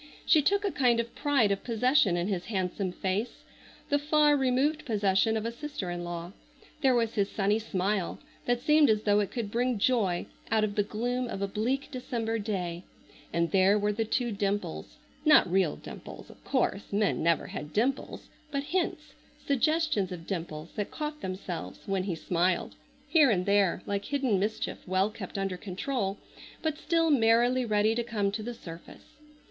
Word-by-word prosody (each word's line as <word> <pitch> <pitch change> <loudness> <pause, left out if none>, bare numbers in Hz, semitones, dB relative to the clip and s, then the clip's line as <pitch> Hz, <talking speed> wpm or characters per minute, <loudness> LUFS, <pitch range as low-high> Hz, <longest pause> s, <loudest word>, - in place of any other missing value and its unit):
She 310 - +5
took 405 +7 +2
a 400 - +1
kind 245 -6 +3
of 235 0 -3
pride 275 -8 +2
of 200 - -1
possession 235 -5 +3
in 175 +1 -1
his 190 -4 -2
handsome 190 -2 -2
face,—the 210 +9 -4
far 295 0 +4
removed 270 +3 +1
possession 210 -1 +2
of 220 - -3
a 230 - -1
sister 235 -7 -5
in 175 0 -4
law. 175 0 -5 0.5
There 265 -2 +4
was 230 -2 +1
his 200 -2 +1
sunny 205 +1 +1
smile, 195 -3 -1 0.3
that 245 0 +1
seemed 300 0 +5
as 215 -1 +2
though 205 0 +3
it 205 -3 0
could 220 -3 -4
bring 245 +1 +1
joy 200 -6 +1 0.2
out 220 0 +2
of 210 -1 0
the 205 - +2
gloom 245 +5 -2
of 195 -3 -4
a - - 0
bleak 235 +7 -1
December 235 -4 -2
day, 180 -5 -3 0.5
and 170 0 0
there 195 +1 +5
were 210 0 +1
the 225 +2 0
two 240 +2 -1
dimples—not 205 - +1
real 185 -4 +2
dimples, - - -10
of - - -19
course, 240 -6 -1
men 205 0 +1
never 170 0 +2
had 150 +1 -7
dimples—but 275 - -2
hints, 360 +4 -2 0.3
suggestions 290 - +1
of 170 -2 -7
dimples, 165 -4 -5
that 205 - -2
caught 300 -1 -5
themselves 180 - -5
when 195 -2 0
he 185 -4 -2
smiled, 175 +2 0 0.3
here 295 -2 +5
and 180 -5 +1
there 200 -3 +2
like 200 0 -2
hidden 260 -8 +1
mischief 215 +3 -2
well 190 +3 +1
kept 200 -2 -7
under 195 -2 -2
control, 195 +2 -3 0.5
but 315 -1 -1
still 330 0 +2
merrily 240 0 +4
ready 215 0 +2
to 240 - 0
come 210 -4 -1
to 215 - -4
the 240 +2 -5
surface. 165 +4 -12
215 Hz, 175 wpm, -29 LUFS, 190-255 Hz, 0.5 s, She